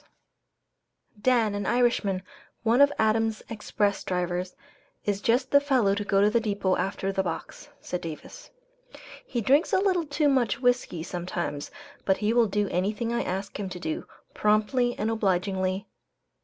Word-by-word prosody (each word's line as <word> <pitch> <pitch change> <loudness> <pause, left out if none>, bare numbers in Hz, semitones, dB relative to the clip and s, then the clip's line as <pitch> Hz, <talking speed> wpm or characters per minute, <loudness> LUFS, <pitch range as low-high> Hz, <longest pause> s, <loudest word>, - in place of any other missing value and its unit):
] 205 - -31
"Dan, 225 -4 +2
an 205 0 -3
Irishman, 235 -6 +1 0.4
one 235 +4 +4
of 285 0 +7
Adams' 220 0 +1
Express 210 -2 -1
drivers, 180 0 -2 0.5
is 205 -1 -1
just 250 +4 +1
the 285 - +6
fellow 255 -8 +2
to 205 +1 -2
go 200 -1 +2
to 205 - +5
the 235 - +3
depot 200 -4 0
after 195 0 -2
the 195 - 0
box," 175 -3 -6
said 180 - -4
Davis. 165 - -8 0.7
"He 240 - -3
drinks 275 +8 +3
a - - +5
little 370 -5 +1
too 290 +1 +1
much 255 -7 +2
whiskey 245 -10 +1
sometimes, 175 -4 -4 0.3
but 190 - +2
he 215 +1 +1
will 235 -1 +4
do 205 +1 0
anything 210 +6 -1
I 235 - +1
ask 195 +2 -4
him 195 -2 -3
to 180 -1 -7
do, 160 -2 -4 0.3
promptly 215 +4 +2
and 220 +1 0
obligingly. 190 -2 0
210 Hz, 160 wpm, -27 LUFS, 190-240 Hz, 0.7 s, of